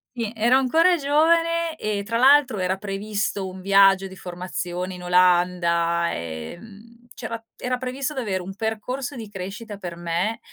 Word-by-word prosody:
sì, 225 -3 -3
ero 235 +4 +4
ancora 325 +7 +4
giovane 330 +3 +2
e 205 -1 -2
tra 230 +3 -2
l'altro 265 -2 +5
era 185 +1 0
previsto 200 0 -3
un 185 0 -9
viaggio 195 0 +5
di 190 - -11
formazione 180 0 -5
in 180 - -10
Olanda, 175 -1 +2
ehm, 205 - -9
c'era 230 -1 -6 0.2
era 250 0 -2
previsto 265 +3 -3
d'avere 210 -9 -2
un 190 +2 -8
percorso 245 +5 -3
di 220 -3 -7
crescita 205 +2 -7
per 175 -3 -7
me 175 +6 -2
205 Hz, 150 wpm, -23 LUFS, 180-250 Hz, 0.2 s, l'altro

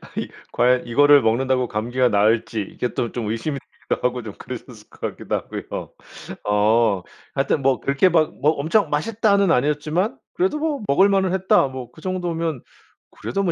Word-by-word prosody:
아니 - - -3 0.2
과연 125 0 +2
이거를 145 +4 +6
먹는다고 125 +2 +1
감기가 120 +4 0
나을지 110 +1 +2
이게 120 +5 -4
또 120 - -2
좀 115 -4 -3
의심이 135 +6 -3
되기도 - - -3
하고 125 -1 -5
좀 105 - -7
그러셨을 120 -3 -10
것 - - -20
같기도 - - -3
하고요. - - -6 0.5
어 105 -1 +2 0.3
하여튼 140 +1 0
뭐 135 -1 +2
그렇게 140 +7 +3
막 160 -2 +2
뭐 150 - +4
엄청 160 +5 +1
맛있다는 200 +4 +2
아니었지만 150 - 0 0.2
그래도 360 -3 0
뭐 300 -3 -1
'먹을 190 +8 +4
만은 190 -2 +2
했다.' 190 -6 +3
뭐 130 -2 -8
그 155 - -17
정도면 170 -6 -2 0.5
그래도 195 - -3
뭐 180 - +1
140 Hz, 360 characters per minute, -22 LUFS, 120-175 Hz, 0.5 s, 이거를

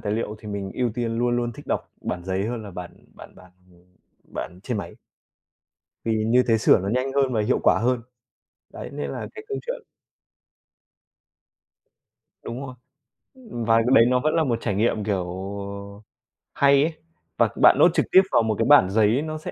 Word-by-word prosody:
tài 105 -1 -3
liệu 110 -1 -3
thì 105 - -10
mình 100 -1 -4
ưu 125 -2 0
tiên 115 -2 -2
luôn 120 0 +1
luôn 120 -1 -2
thích - - -13
đọc - - -3
bản 90 - -4
giấy 95 +2 -2
hơn 115 -1 -4
là 100 - -9
bản 90 -1 -8 0.2
bản - - -13
bản, 90 -1 -17 0.2
ừm, 90 +1 -25 0.4
bản 90 - -6
trên 125 - -3
máy. - - -7 1.1
vì 110 -1 0
như 125 +3 +4
thế 115 - +4
sửa 105 - +5
nó 95 - -4
nhanh 130 +5 -1
hơn 135 -2 +1
và 110 - +1
hiệu 125 +5 +1
quả - - +4
hơn. 125 +1 0 0.7
Đấy - - -7
nên - - -4
là - - -5
cái 430 - -8
câu 415 - -3
chuyện - - -4 2.6
Đúng 120 +2 -6
rồi. 130 - -9 0.6
Ừm, 225 - -7
vài 115 +1 +4
cái 130 - +3
đấy 115 - +7
nó 125 0 +2
vẫn 155 +3 0
là 165 - +2
một 120 -5 0
trải 105 -4 -2
nghiệm, 105 0 0
kiểu, 95 -4 -1 1.3
hay 140 0 +4
ấy 160 +2 -1 0.4
và - - +3
bạn - - +8
note - - +6
trực - - +1
tiếp 190 - +8
vào - - +4
một 110 -1 0
cái - - +2
bản 145 -9 +6
giấy 110 +5 +2
nó 155 0 -4
sẽ 155 - -7
115 Hz, 200 wpm, -24 LUFS, 105-130 Hz, 2.6 s, bạn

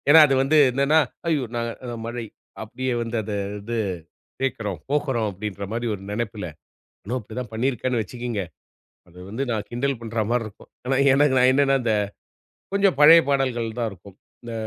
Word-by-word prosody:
ஏன்னா 160 +2 +10
அது 135 - +2
வந்து. 150 +3 +3
என்னான்னா, 140 +5 +3 0.3
ஐயோ! 155 -5 +1
நான் 115 0 -1 0.2
அது 120 -1 -5
மழை 120 0 -4 0.4
அப்படியே 130 +4 -3
வந்து 115 0 -4
அதை 105 0 -4 0.2
இது 115 +3 -4 0.7
கேக்கறோம், 110 -8 -2
போகறோம் 135 -7 0
அப்படின்ற 100 0 -5
மாரி 120 +1 -2
ஒரு 95 - -9
நெனைப்புல. 105 -2 -3 0.6
நானும் 120 +6 -2
அப்டி 110 -1 -12
தான் 125 -3 -6
பண்ணி 120 +5 +1
இருக்கேன்னு 125 -1 -1
வச்சுக்குங்க. 120 -1 -4 0.7
அது 90 +1 -17
வந்து 110 +7 -3
நான் 105 -3 -2
கிண்டல் 135 +2 -1
பண்றா 115 -1 -2
மாரி 120 -1 +1
இருக்கும். 105 - -14 0.2
ஆனா 130 +1 +1 0.2
எனக்கு, 140 0 +4
நான் 125 0 +5
என்னான்னா 135 0 +3
இந்த, 115 -2 +1 0.8
கொஞ்சம் 195 -6 +3
பழைய 165 +3 +9
பாடல்கள் 120 -5 0
தான் 115 -2 0
இருக்கும். 95 0 -14 0.3
இந்த, 120 -1 -7
120 Hz, 170 wpm, -24 LUFS, 110-135 Hz, 0.8 s, ஏன்னா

